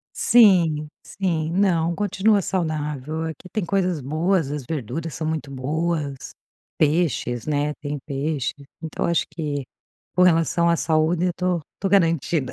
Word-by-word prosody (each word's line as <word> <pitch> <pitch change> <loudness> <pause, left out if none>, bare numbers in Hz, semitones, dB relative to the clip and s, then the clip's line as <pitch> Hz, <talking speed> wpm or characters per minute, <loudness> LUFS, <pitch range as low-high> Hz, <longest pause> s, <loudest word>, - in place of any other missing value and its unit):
Sim, 170 -10 +5
sim, 165 -5 -2
não, 175 -3 +2
continua 205 +1 +2
saudável. 155 -4 -2
Aqui 160 +2 -6
tem 215 -5 -2
coisas 180 -4 0
boas. 160 +3 0
As 145 -3 -4
verduras 155 +3 -4
são 160 - -4
muito 155 -3 -3
boas, 145 +1 -3 0.4
peixes, 150 -7 +1
né, 150 0 0
tem 145 0 -5
peixe. 140 -1 -2 0.3
Então 160 - -3
eu - - +1
acho 170 - +1
que 145 -4 -4 0.5
com 180 - +4
relação 170 -1 +3
à 170 - +3
saúde, 160 +2 +1
eu - - +2
estou, 180 0 -1
estou 195 - -3
garantida. 165 -6 +2
160 Hz, 145 wpm, -23 LUFS, 150-175 Hz, 0.5 s, Sim